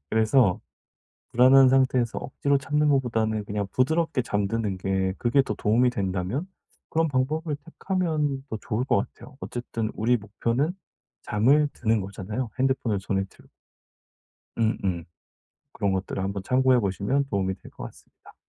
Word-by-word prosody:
그래서 110 Hz, -2 st, +3 dB, 0.7 s
불안한 130 Hz, +2 st, +7 dB
상태에서 130 Hz, -3 st, +2 dB
억지로 140 Hz, +1 st, 0 dB
참는 150 Hz, +2 st, +1 dB
것보다는 115 Hz, -6 st, +1 dB
그냥 100 Hz, -1 st, -3 dB
부드럽게 160 Hz, +1 st, +1 dB
잠드는 105 Hz, -2 st, -1 dB
게 95 Hz, 0 st, 0 dB
그게 120 Hz, +3 st, +3 dB
더 135 Hz, -, -3 dB
도움이 120 Hz, +4 st, +3 dB
된다면 100 Hz, -, -2 dB, 0.4 s
그런 165 Hz, 0 st, +1 dB
방법을 150 Hz, +3 st, -1 dB
택하면 160 Hz, -6 st, -1 dB
더 110 Hz, -, -3 dB
좋을 115 Hz, +4 st, -2 dB
것 -, -, +2 dB
같아요. 145 Hz, -, -6 dB
어쨌든 115 Hz, -2 st, -4 dB
우리 120 Hz, +3 st, +2 dB
목표는 115 Hz, -, -1 dB, 0.5 s
잠을 135 Hz, +8 st, +3 dB
드는 110 Hz, -2 st, +1 dB
거잖아요 100 Hz, +5 st, -5 dB
핸드폰을 130 Hz, -6 st, +1 dB
손에 95 Hz, 0 st, -1 dB
들고. -, -, -21 dB, 1.1 s
음음. 95 Hz, -6 st, 0 dB, 0.7 s
그런 100 Hz, -1 st, 0 dB
것들을 95 Hz, 0 st, -2 dB
한번 100 Hz, 0 st, -3 dB
참고해 130 Hz, +4 st, +3 dB
보시면 100 Hz, +8 st, 0 dB
도움이 95 Hz, -2 st, 0 dB
될 -, -, -14 dB
것 -, -, -9 dB
같습니다. -, -, -14 dB
120 Hz, 330 characters per minute, -25 LUFS, 100-135 Hz, 1.1 s, 불안한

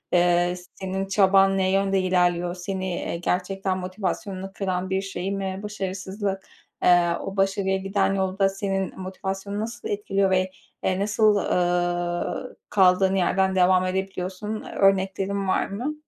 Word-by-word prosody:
ııı, 175 Hz, 0 st, +3 dB, 0.2 s
senin 190 Hz, 0 st, -3 dB
çaban 195 Hz, 0 st, +4 dB
ne 190 Hz, -1 st, +2 dB
yönde 195 Hz, 0 st, +2 dB
ilerliyor? 180 Hz, -1 st, +1 dB
Seni, 190 Hz, +1 st, -4 dB
eee, 170 Hz, -, -3 dB
gerçekten 185 Hz, +2 st, -1 dB
motivasyonunu 190 Hz, +1 st, -4 dB
kıran 185 Hz, -2 st, -2 dB
bir 190 Hz, 0 st, 0 dB
şey 195 Hz, -1 st, -4 dB
mi 195 Hz, -1 st, -3 dB
başarısızlık? 195 Hz, -1 st, -4 dB, 0.4 s
Iıı, 175 Hz, -1 st, +4 dB
o 195 Hz, 0 st, -6 dB
başarıya 195 Hz, 0 st, +1 dB
giden 195 Hz, 0 st, 0 dB
yolda 195 Hz, 0 st, +1 dB
senin 195 Hz, -1 st, -3 dB
motivasyonunu 195 Hz, +2 st, -4 dB
nasıl 225 Hz, -1 st, -5 dB
etkiliyor 200 Hz, -1 st, 0 dB
ve, 185 Hz, 0 st, +2 dB, 0.3 s
ııı, 185 Hz, 0 st, +1 dB
nasıl, 210 Hz, +1 st, +3 dB
ııı, 175 Hz, +3 st, -1 dB
kaldığın 190 Hz, -1 st, +4 dB
yerden 190 Hz, +1 st, +2 dB
devam 185 Hz, 0 st, +4 dB
edebiliyorsun? 190 Hz, +3 st, -3 dB, 0.2 s
Örneklerin 195 Hz, 0 st, +2 dB
var 185 Hz, -, +1 dB
mı? 240 Hz, +10 st, -3 dB
190 Hz, 130 wpm, -24 LUFS, 185-195 Hz, 0.4 s, çaban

